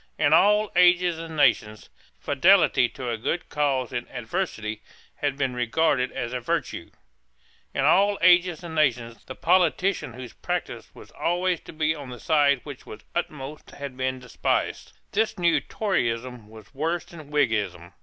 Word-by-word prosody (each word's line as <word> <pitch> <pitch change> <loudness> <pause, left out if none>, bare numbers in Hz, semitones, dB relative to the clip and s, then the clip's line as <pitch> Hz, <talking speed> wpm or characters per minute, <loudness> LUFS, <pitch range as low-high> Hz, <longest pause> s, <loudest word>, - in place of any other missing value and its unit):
In 145 - +3
all 210 +5 +4
ages 175 -1 +4
and 165 -1 -7
nations, 110 -7 +1 0.3
fidelity 160 -4 +4
to 125 -2 -5
a 115 - -3
good 170 +9 -3
cause 135 -4 0
in 120 0 -3
adversity 110 - -4 0.4
had 140 -1 -2
been 135 -3 -1
regarded 125 +2 +1
as 125 -2 -4
a 125 - -2
virtue. 115 - -3 0.8
In - - 0
all 200 +2 +4
ages 175 -1 +4
and 170 -2 -7
nations, 125 -7 0
the 130 - -8
politician 180 - +1
whose 125 -1 -9
practice - - -4
was - - -14
always 175 0 0
to - - -12
be 155 0 0
on 145 -4 -9
the 125 -1 -9
side 145 -3 +3
which 145 -3 -9
was 110 - -10
uppermost 150 -3 -5
had 140 -2 -8
been 130 0 -2
despised. 125 -1 -2 0.2
This 220 +1 0
new 170 -2 +3
Toryism 125 - -2
was 110 -3 -15
worse 165 +5 -2
than 155 -4 -12
Whiggism. 105 - -1
145 Hz, 155 wpm, -25 LUFS, 125-175 Hz, 0.8 s, all